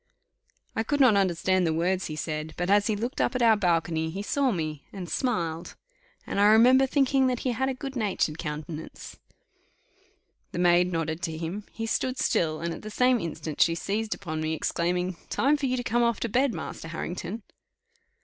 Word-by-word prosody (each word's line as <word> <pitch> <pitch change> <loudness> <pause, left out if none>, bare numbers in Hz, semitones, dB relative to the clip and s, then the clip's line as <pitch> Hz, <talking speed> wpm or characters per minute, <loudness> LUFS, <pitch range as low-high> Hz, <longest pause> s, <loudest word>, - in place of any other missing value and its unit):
I - - +1
could 285 +6 -1
not 255 -6 +6
understand 185 -1 +2
the 160 - +1
words 180 +3 0
he 155 - -5
said, 155 0 -4
but 175 +2 0
as 205 0 +4
he 215 - +1
looked 235 +5 -3
up - - 0
at 250 - +1
our 225 -1 +6
balcony 165 -4 0
he 195 +5 -5
saw 275 +5 +1
me 155 -6 -3 0.2
smiled 170 - -2 0.5
and - - -2
I 205 - +5
remember 250 +5 +6
thinking 270 -1 +3
that 250 -2 -1
he 255 - 0
had 265 +3 0
a 265 - -2
good 270 +1 -6
natured 195 -8 -1
countenance. 155 +1 -7 1.3
The - - -4
maid 175 0 +4
nodded 165 -1 -2
to 160 -3 -3
him; 175 +6 -5
he 225 - -4
stood 255 +3 -1
still, 155 -8 0
and 170 0 -2
at - - -8
the 215 - -7
same 250 +3 +3
instant 160 -3 -4
she 165 - +4
seized 210 +5 -2
upon 155 -5 -5
me, 155 0 -1
exclaiming, 180 +3 -1
"Time 285 +3 +2
for 285 -2 -1
you 255 0 0
to 245 - -2
come 240 0 +1
off 235 -2 +1
to 235 - -1
bed, 255 +4 +2
Master 165 - -6
Harrington." 175 +5 -5
190 Hz, 195 wpm, -27 LUFS, 165-240 Hz, 1.3 s, not